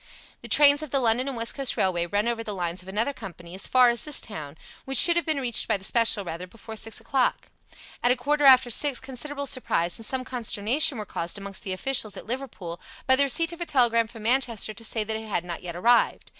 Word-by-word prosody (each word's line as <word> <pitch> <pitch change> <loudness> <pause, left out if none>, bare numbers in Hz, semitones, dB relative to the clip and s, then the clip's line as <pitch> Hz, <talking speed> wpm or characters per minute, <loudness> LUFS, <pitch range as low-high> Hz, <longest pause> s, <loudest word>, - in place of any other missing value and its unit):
The - - -9
trains 290 0 +5
of 310 - -6
the 275 - +1
London 245 +1 +1
and 270 -3 -5
West 230 0 -1
Coast 275 -3 -2
Railway 175 -2 0
run 205 +5 -1
over 235 -1 -2
the 210 -2 -5
lines 175 -1 -4
of 180 - -18
another 220 +8 -1
company 175 -7 -11
as 190 - -5
far 250 -1 +5
as 235 - 0
this 300 -2 -1
town, 155 -8 -7 0.3
which 270 -1 0
should 340 +1 +8
have 345 -1 -1
been 310 -3 0
reached 245 -4 +2
by - - +1
the 190 - -16
special 225 -1 +2
rather 170 +2 -6
before 220 +3 -11
six 220 0 -3
o'clock. 265 -2 -1 0.5
At 245 - +2
a - - +4
quarter 290 +4 0
after 260 -2 +6
six 280 +2 +1
considerable 280 +2 -6
surprise 175 -10 0
and 225 - -4
some 260 -1 -2
consternation 250 +4 +1
were 210 - -5
caused 170 -1 -5
amongst 200 -1 -7
the 190 - -4
officials 215 +1 0
at - - -9
Liverpool 225 -9 -6 0.2
by 260 - +5
the 270 - +2
receipt 320 +5 +2
of 340 - -11
a - - -2
telegram 230 -4 +2
from 225 -1 -12
Manchester 235 -3 0
to 230 +2 -6
say 220 -1 -1
that 220 +1 -3
it 220 0 -9
had 175 -4 -2
not 170 -2 -6
yet 175 -2 -7
arrived. 235 +7 +1
230 Hz, 240 wpm, -25 LUFS, 200-265 Hz, 0.5 s, should